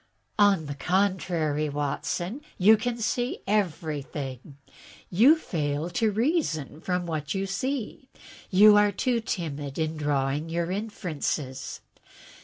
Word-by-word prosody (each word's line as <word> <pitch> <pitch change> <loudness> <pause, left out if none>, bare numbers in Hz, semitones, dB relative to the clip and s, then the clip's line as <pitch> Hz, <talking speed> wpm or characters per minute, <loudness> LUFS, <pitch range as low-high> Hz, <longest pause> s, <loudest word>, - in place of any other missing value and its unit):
"On 200 -6 +4
the 145 - -4
contrary, 170 -3 0
Watson, 175 - -3 0.2
you 210 +4 +7
can 235 +2 -2
see 245 +2 -2
everything. 150 - -3 0.5
You 235 - +7
fail 155 - -2
to 220 +5 +1
reason 215 - -1
from 180 -1 -1
what 155 -2 -3
you 195 0 -1
see. 255 +5 -3 0.4
You 205 +2 +7
are 205 0 +4
too 235 +4 0
timid 150 -9 -4
in 160 -1 -1
drawing 145 +1 -1
your 170 +1 -1
inferences." 155 -9 -3
175 Hz, 115 wpm, -27 LUFS, 150-210 Hz, 0.5 s, you